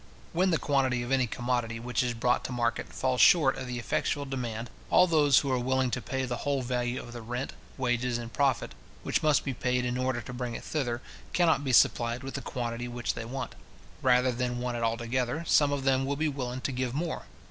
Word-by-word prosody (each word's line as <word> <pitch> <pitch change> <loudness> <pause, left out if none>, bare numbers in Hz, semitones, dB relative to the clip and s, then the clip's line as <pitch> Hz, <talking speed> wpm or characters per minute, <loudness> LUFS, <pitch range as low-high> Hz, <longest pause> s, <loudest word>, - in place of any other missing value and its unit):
When 185 +3 +3
the 165 - +3
quantity 130 -5 +1
of 120 - -5
any 130 -2 +3
commodity 120 -1 -2
which 120 +1 -1
is 120 -2 -1
brought 125 +2 +1
to - - -4
market 120 -1 -1
falls 130 -2 0
short 145 -3 +6
of 130 - -6
the 125 -1 -4
effectual 140 +4 -1
demand, 120 -4 -4 0.2
all 180 - +6
those 150 -6 +4
who 140 - +2
are 130 - +2
willing 130 0 +1
to 125 - -1
pay 130 +5 -2
the 120 -1 -3
whole 140 0 -1
value 125 0 -1
of 120 - -9
the 120 - -7
rent, 120 +4 -4 0.2
wages, 125 -2 0
and 115 -1 -7
profit, 140 -2 +1 0.3
which - - 0
must 155 -3 +3
be 135 - -1
paid 125 +1 0
in 125 +1 -1
order 130 -1 0
to 120 +2 -8
bring 125 -1 -4
it - - -6
thither, 125 -5 -2 0.3
cannot 165 -4 +3
be 135 - 0
supplied 120 +1 +3
with 135 - -6
the 140 - -3
quantity 120 -1 -4
which 120 -1 -2
they 115 - -6
want. 130 +4 -5 0.5
Rather 125 0 +4
than 125 0 -2
want 120 0 -2
it 120 - -3
altogether, 120 +5 -1
some 145 -3 +4
of 140 -1 -1
them 135 -1 +3
will 140 +1 -1
be 155 +2 0
willing 130 -3 -3
to - - -2
give 130 -1 -2
more. 165 +2 -3
125 Hz, 225 wpm, -29 LUFS, 120-135 Hz, 0.5 s, short